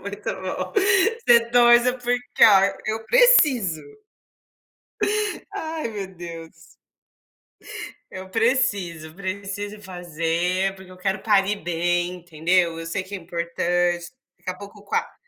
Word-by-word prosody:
Muito - - -5
bom. - - -5
Você 385 - +3
torça 240 +1 +5
porque, 245 0 -2
ó, 200 -3 +7 0.3
eu 220 +1 -3
preciso. 295 - +5 1.7
Ai, 315 -5 -4
meu 205 -3 -5
Deus. 165 -1 -9 1.6
Eu 190 0 -8
preciso, 195 - 0
preciso 200 +2 -5
fazer, 180 +1 -2
porque 190 -1 -14
eu 185 - -13
quero 195 +1 -2
parir 205 -1 +2
bem, 175 +1 -1
entendeu? 170 0 0
Eu 165 - -7
sei 185 +3 -2
que 190 +2 -10
é 195 - -3
importante, 175 0 -1 0.3
daqui - - -5
a 185 - -5
pouco 200 +1 -12
qua 455 - -2
190 Hz, 120 wpm, -23 LUFS, 175-235 Hz, 1.7 s, ó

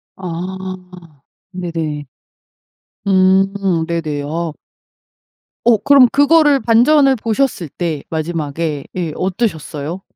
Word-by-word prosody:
아. 180 -3 -8 0.3
네네. 165 -5 -4 1.0
음 190 -2 +2
네네. 155 -4 -2
어. 160 +2 -3 1.1
어 235 -2 +5
그럼 275 +3 +6
그거를 290 -1 +4
반전을 265 +4 +4
보셨을 220 - -1
때 160 -2 -4
마지막에 155 -2 -3
예 170 -4 -2
어떠셨어요? 180 - -3
180 Hz, 175 characters per minute, -17 LUFS, 160-210 Hz, 1.1 s, 그럼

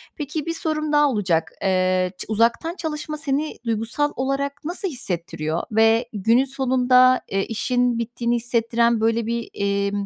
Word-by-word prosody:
Peki, 300 0 -4
bir 330 - -2
sorum 310 -2 -2
daha 295 -1 +4
olacak. 175 -8 0
Eee, 185 -1 +1
ç - - -6
uzaktan 230 +10 +1
çalışma 305 -3 -4
seni 295 +1 -1
duygusal 230 +6 -1
olarak 275 +2 -1
nasıl 360 +4 -2
hissettiriyor 170 - -2
ve 225 +2 +4
günün 225 +6 +3
sonunda, 255 -1 +3
eee, 195 0 -1
işin 245 +1 0
bittiğini 235 +1 -1
hissettiren, 235 -1 +1
böyle, 225 0 +1
bir, 235 0 -3
eee, 200 0 -1
235 Hz, 145 wpm, -22 LUFS, 215-280 Hz, -, daha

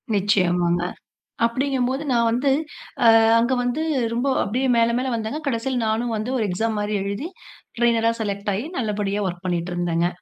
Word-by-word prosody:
நிச்சயமாங்க. 180 -3 +2 0.6
அப்படிங்கும்போது 260 +2 -1
நான் 235 -1 +3
வந்து, 265 +4 +1 0.5
அ - - +8 0.3
அங்க 240 +3 +1
வந்து 245 +6 -1 0.3
ரொம்ப 245 +4 -1 0.2
அப்படியே 255 +6 -1
மேல 230 0 +3
மேல 260 0 -1
வந்தேங்க. 225 +8 -4
கடைசில 255 0 -1
நானும் 225 +1 0
வந்து 225 +5 -3
ஒரு 220 - 0
எக்ஸாம் 220 +4 -1
மாதிரி 205 0 -1
எழுதி 200 - -4 0.5
ட்ரைனரா 230 -1 +3
செலக்ட் 200 0 -2
ஆயி, 225 +8 -3
நல்லபடியா 210 -3 -1
வொர்க் 175 0 -6
பண்ணிட்டு 175 0 -2
இருந்தேங்க. 175 -1 0
225 Hz, 155 wpm, -22 LUFS, 200-245 Hz, 0.6 s, அ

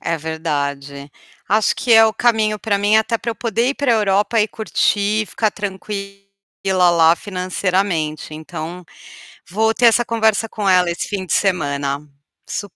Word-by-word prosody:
É 165 - -2
verdade, 140 -3 -4 0.4
acho 215 +2 +2
que 245 -3 +1
é 225 0 +8
o 220 - +2
caminho 220 -3 +1
para 205 -2 0
mim, 205 +2 +3
até 225 +1 +1
para 230 - -4
eu - - -5
poder 230 +2 -1
ir 280 - -1
para 275 -4 +1
Europa 210 +1 +2
e 210 - +1
curtir, 215 -1 0
ficar 215 -2 -1
tranquila 200 0 -6 0.7
lá, 165 -1 +5
financeiramente, 180 -5 -2
então 165 +3 -7 0.6
vou 220 +4 +1
ter 240 +1 +3
essa 235 +1 +4
conversa 225 -1 +1
com 205 -2 -3
ela 180 -2 +4
esse 170 - -4
fim 195 -3 -3
de - - -3
semana, 145 -7 0 0.5
su 205 -2 -5
200 Hz, 160 wpm, -19 LUFS, 170-220 Hz, 0.7 s, é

